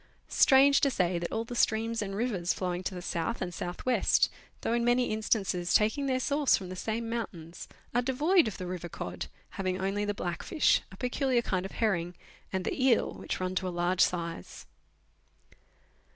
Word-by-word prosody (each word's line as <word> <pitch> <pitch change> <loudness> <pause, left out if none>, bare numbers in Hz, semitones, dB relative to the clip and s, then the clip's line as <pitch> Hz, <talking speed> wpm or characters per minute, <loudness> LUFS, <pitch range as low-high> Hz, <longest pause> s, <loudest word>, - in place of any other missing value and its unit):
Strange 275 +1 +6
to 280 - +4
say 180 -7 0
that 170 - -4
all 225 - -1
the 240 +1 -7
streams 225 0 +1
and 195 -1 -4
rivers 200 -6 0
flowing 180 -1 -2
to 185 0 -4
the 180 - -6
south 170 +9 -2
and 180 -1 -4
south 175 +1 -6
west, 245 -5 +3 0.3
though - - 0
in 235 0 +1
many 245 +1 +2
instances 195 -5 0
taking 220 +7 +2
their 260 -1 +1
source 285 +1 +2
from 185 -2 -7
the 185 - -6
same 225 +5 -3
mountains, 180 -8 -5 0.3
are 245 - +3
devoid 295 +7 +3
of 215 - -4
the 185 - -5
river 180 -1 -5
cod, 90 - -5 0.3
having 185 -1 -1
only 195 +2 -1
the 205 0 -1
blackfish, 175 - +1
a 190 - -12
peculiar 250 +1 0
kind 185 -3 -1
of - - -15
herring, 175 -6 0 0.4
and 190 -1 -2
the 260 - -1
eel, 250 -4 +3
which - - -5
run 185 0 -2
to 185 0 -1
a - - -1
large 175 +1 0
size. 170 - -1
200 Hz, 190 wpm, -29 LUFS, 180-240 Hz, 0.4 s, Strange